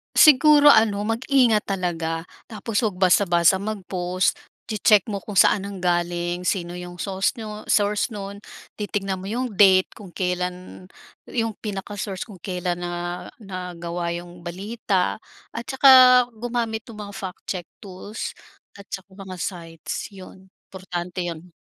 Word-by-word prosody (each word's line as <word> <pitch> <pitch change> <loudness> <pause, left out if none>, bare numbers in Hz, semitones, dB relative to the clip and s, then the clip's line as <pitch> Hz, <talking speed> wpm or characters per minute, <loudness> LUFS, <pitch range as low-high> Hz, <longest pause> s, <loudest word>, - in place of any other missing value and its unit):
Siguro 295 0 +7
ano, 215 -4 +5
mag-ingat 230 0 +2
talaga 170 -4 -2 0.2
tapos 220 0 -2
huwag 195 -3 -3
basta-basta 180 -1 +4
mag-post, 185 -3 -1 0.3
che-check 215 0 +3
mo 200 - -2
kung 205 +1 -8
saan 195 +1 +4
nanggaling, 175 -2 -1
sino 175 -2 -1
'yong 175 0 -8
sauce 195 +2 0
niyo 215 -3 -8
source 210 +2 +1
no'n, 200 0 -6 0.4
titignan 195 -2 -2
mo 185 - -9
'yong 245 +4 -2
date 190 -2 +6
kung 195 -5 -12
kailan 180 0 -3 0.4
'yong 225 -3 -2
pinaka-source 200 0 -5
kung 195 - -11
kailan 180 -1 -3
na 175 0 -4 0.2
nagawa 175 -3 -5
'yong 175 0 -9
balita 195 +1 -1 0.3
at 235 0 -6
tsaka 270 0 +5 0.4
gumamit 230 -1 -3
nung 210 -3 -9
mga - - -11
fact 185 -2 -7
check 180 -3 -3 0.2
tools 200 +2 -7 0.4
at 200 - -12
tsaka 190 0 -8
mga 190 -1 -8
sites, 170 +2 -5
'yon 190 0 -13 0.2
importante 180 -1 -5
'yon. 170 +1 -7
190 Hz, 135 wpm, -23 LUFS, 180-210 Hz, 0.4 s, Siguro